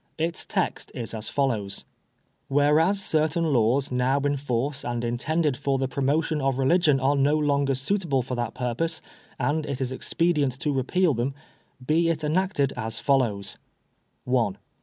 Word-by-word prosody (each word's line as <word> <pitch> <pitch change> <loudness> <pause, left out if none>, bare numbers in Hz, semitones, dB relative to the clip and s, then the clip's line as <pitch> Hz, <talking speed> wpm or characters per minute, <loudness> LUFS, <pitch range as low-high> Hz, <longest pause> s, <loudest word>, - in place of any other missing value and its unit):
Its 165 +1 -1
text - - -2
is 115 -1 -5
a 110 - -4
follows: 110 -5 -1 0.3
— - - -43 0.3
"Whereas 150 +7 +3
certain 155 0 +1
laws 125 +3 +2
now 125 +2 +2
in 145 0 +1
force 135 0 -2
and 120 0 -3
intended 145 +5 0
for 140 +1 0
the 135 0 0
promotion 145 +4 0
of 135 -1 0
religion 150 +1 +3
are 135 +2 +2
no 145 +2 +3
longer 140 -2 +1
suitable 140 -1 0
for 125 - -5
that 120 -2 -3
purpose 130 +7 -2 0.4
and 155 +2 0
it 140 -3 -4
is 130 -1 -2
expedient 145 -2 0
to 150 - 0
repeal 155 +6 +2
them, 125 +3 -2 0.3
" 125 - -20
Be 165 +4 +2
it 160 -2 -1
enacted 155 -2 +1
as 110 0 -4
follows: 115 -8 0 0.3
— - - -46
"1. 120 -6 +1
140 Hz, 165 wpm, -25 LUFS, 125-155 Hz, 0.4 s, Whereas